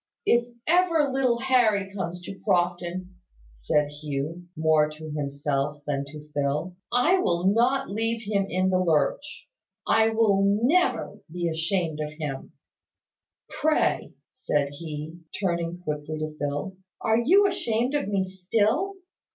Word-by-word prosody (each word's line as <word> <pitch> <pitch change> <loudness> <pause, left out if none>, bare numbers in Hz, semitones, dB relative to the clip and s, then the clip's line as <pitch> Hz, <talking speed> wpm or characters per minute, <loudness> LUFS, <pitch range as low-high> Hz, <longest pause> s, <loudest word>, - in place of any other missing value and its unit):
"If 235 0 +3 0.2
ever 330 -4 +3
little 255 -3 +2
Harry 220 -7 +2
comes 180 -2 -4
to 195 - -7
Crofton," 180 -1 -1 0.4
said 145 - 0
Hugh, 150 +3 -5
more 155 -1 +3
to 155 0 -9
himself 145 0 -2
than 140 -1 -1
to 150 +1 -11
Phil, 145 +5 -1 0.2
"I 305 +10 +4
will 175 - 0
not 255 +2 +2
leave 225 +2 -1
him 200 -2 0
in 185 +1 +1
the 185 - +3
lurch, 180 - 0 0.4
I 225 0 +4
will 220 -3 +3 0.2
never 350 +8 +2
be 175 0 -2
ashamed 165 -1 -1
of 150 0 -3
him. 150 -3 -6 0.9
Pray," 310 0 0 0.2
said 150 - -1
he, 155 +2 -7 0.2
turning 170 -3 -1
quickly 150 -1 -4
to 155 0 -4
Phil, 145 +6 -3 0.2
"are 220 +1 +2
you 370 +12 +5
ashamed 245 - 0
of 290 -5 0
me 200 -2 +1
still?" 215 - 0
180 Hz, 135 wpm, -26 LUFS, 150-230 Hz, 0.9 s, you